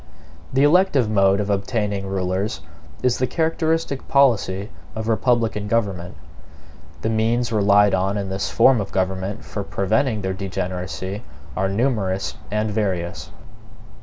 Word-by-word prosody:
The 135 +2 +3
elective 145 - +4
mode 100 -1 +4
of 105 0 -1
obtaining 100 -1 -1
rulers 95 +2 -2 0.4
is 125 -1 +2
the 130 - +1
characteristic 160 -3 -1
policy 110 -7 +2 0.2
of 110 0 -4
republican 115 -2 +1
government. 100 -6 -1 0.9
The 110 - +1
means 115 +1 +1
relied 105 -1 +4
on 95 +2 +1
in 100 -1 -3
this 95 +1 -2
form 120 -1 +4
of 100 - -6
government 95 +1 -2
for 100 - -4
preventing 110 +3 0
their 95 0 -1
degeneracy 95 +1 -4 0.3
are 95 0 0
numerous 100 -4 0 0.2
and 105 +1 -1
various. 90 -7 -2
105 Hz, 130 wpm, -22 LUFS, 95-115 Hz, 0.9 s, elective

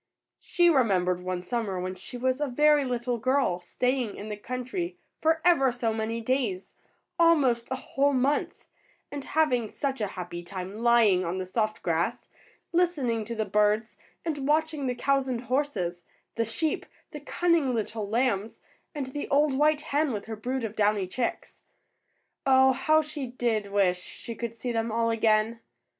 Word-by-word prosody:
She 350 0 +2
remembered 190 - +3
one 180 0 -3
summer, 205 -3 -2
when 185 +1 -3
she 190 +7 -8
was 255 +3 0
a 295 - +1
very 295 +2 +4
little 245 -1 -2
girl, 255 -7 +1
staying 250 +5 -1
in 210 - -7
the 210 - -3
country 255 - -4 0.2
for 320 0 +3
ever 275 -7 +5
so 235 -2 -1
many 225 +1 -2
days, 225 -6 -1 0.5
almost 275 -9 +4
a 260 - -1
whole 275 +2 0
month, 275 +2 0 0.5
and 285 -1 -5
having 255 -9 +1
such 270 -1 -3
a 210 - +1
happy 175 -1 -5
time 185 +3 -7
lying 230 -6 +4
on 175 +1 -2
the 185 - -3
soft 215 +3 -2
grass, 175 +8 -1 0.4
listening 285 -11 +1
to 235 - -5
the 220 -1 -1
birds, 210 +2 +1 0.3
and 290 -4 -2
watching 310 -2 +1
the 250 - -1
cows 275 +1 +1
and 245 -2 -2
horses, 225 -10 -2 0.3
the 230 - 0
sheep, 295 +8 -2 0.2
the 300 - -7
cunning 315 -3 +1
little 215 -1 -3
lambs, 225 -2 0 0.4
and 265 -3 -4
the 290 - -4
old 290 0 +3
white 300 +2 +3
hen 295 0 0
with 205 -2 -4
her 225 - -5
brood 250 +4 -3
of 220 -1 -4
downy 210 -2 +2
chicks. 235 +7 -4 0.8
Oh, 265 0 +5
how 310 +4 +3
she 300 -3 -5
did 235 -4 -1
wish 190 -3 +2
she 230 - -8
could 230 0 -5
see 245 +1 -3
them 225 -1 -1
all 230 +1 +1
again! 220 0 +2
240 Hz, 170 wpm, -27 LUFS, 215-275 Hz, 0.8 s, ever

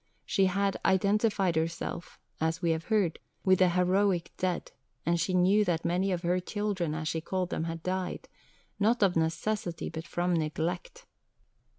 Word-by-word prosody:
She 195 -1 +3
had 195 +1 0
"identified 200 -1 +2
herself," 165 +1 -3 0.2
as 160 +1 0
we 170 -2 +1
have 160 0 -2
heard, 205 -7 +1 0.3
"with 185 -1 +5
the 185 -1 +5
heroic 180 0 +2
dead," 180 -1 -2 0.3
and 170 +1 +2
she 185 +3 0
knew 190 +4 +4
that 165 -3 -1
many 185 +3 +1
of 180 -1 -2
her 180 +1 +2
"children," 190 -4 -2
as 155 0 -3
she 160 +1 -1
called 185 +1 -2
them, 160 - -1
had 165 0 -5
died, 185 0 -3 0.5
not 220 +3 +3
of 190 -3 +3
necessity, 170 +2 -1
but 160 +1 -6
from 175 +1 0
neglect. 170 - -2
180 Hz, 165 wpm, -29 LUFS, 165-195 Hz, 0.5 s, with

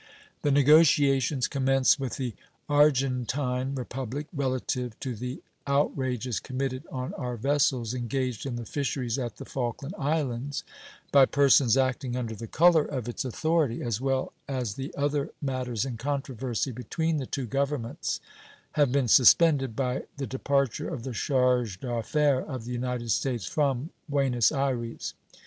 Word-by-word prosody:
The 145 - +1
negotiations 140 -2 +4
commenced 135 0 +3
with 135 -3 -3
the 125 -4 -3 0.3
Argentine 135 -2 +1
Republic 130 +2 -4
relative 130 -4 -2
to 130 -3 -3
the 125 +4 -6 0.2
outrages 130 -4 0
committed 130 +2 -4
on 130 -2 -4
our 125 -1 -4
vessels 130 -2 +1
engaged 125 -1 -2
in 125 - -3
the 120 -1 -5
fisheries 130 -2 -2
at 120 -5 -4
the - - -8
Falkland 135 +5 -4
Islands 140 -2 -1 0.5
by 135 -2 +7
persons 135 -3 +4
acting 130 -1 0
under 120 -3 -3
the 115 +1 -7
color 165 +4 +5
of 130 -6 -4
its 120 - -3
authority, 150 0 0
as 120 -1 -2
well 135 -1 -1
as 125 -6 -2
the 135 +5 -6
other 145 +1 0
matters 130 -4 -2
in 125 -4 -4
controversy 130 -2 -2
between 160 +7 -2
the 135 -3 -3
two 135 -3 -3
Governments, 135 0 -2 0.5
have 145 -4 +2
been 135 -2 +2
suspended 135 0 +5
by 130 0 -1
the 140 - -3
departure 140 -1 0
of 115 - -5
the 130 - -5
charge 125 -5 +1
d'affaires 130 +4 +1
of 130 -6 -5
the 125 - -6
United 120 -1 -2
States 120 -4 0
from 140 0 0 0.2
Buenos 135 -5 +2
Ayres. 130 -5 -2
130 Hz, 145 wpm, -27 LUFS, 125-140 Hz, 0.5 s, by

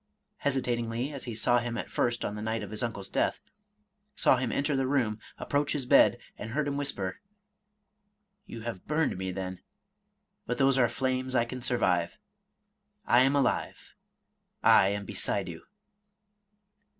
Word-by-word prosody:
— - - -51
hesitatingly 125 -1 -1
as 140 - -5
he 120 -3 -5
saw 120 +2 +3
him 120 -1 -3
at - - -5
first 120 -1 0
on 105 - -3
the 105 - -6
night 110 +1 -2
of - - -8
his 110 - -3
uncle's 105 -5 -1
death, - - 0 0.4
— 210 - -43 0.3
saw 130 - +4
him 125 -1 -1
enter 140 +1 0
the 135 -1 +1
room, 120 -6 0 0.2
approach 145 0 0
his 140 -4 -2
bed, - - +6 0.2
and 110 - -5
heard 150 +1 0
him 140 - -1
whisper, 120 -10 -3 0.6
" 205 0 -49
You 115 - -8
have 110 -5 -6
burned 155 +1 +1
me, 95 0 -3
then; 95 -1 -5 0.9
but 125 - -1
those 135 0 +3
are 120 -2 +4
flames 130 +1 -2
I 120 -1 +3
can 125 +1 -7
survive. 95 -9 +1 0.5
— - - -50
I 120 - +5
am 135 +2 +3
alive, 135 -3 -1 0.4
— - - -50 0.2
I 95 - +7
am 100 0 -2
beside 100 -1 0
you." 85 -2 -8
120 Hz, 175 wpm, -29 LUFS, 110-140 Hz, 0.9 s, I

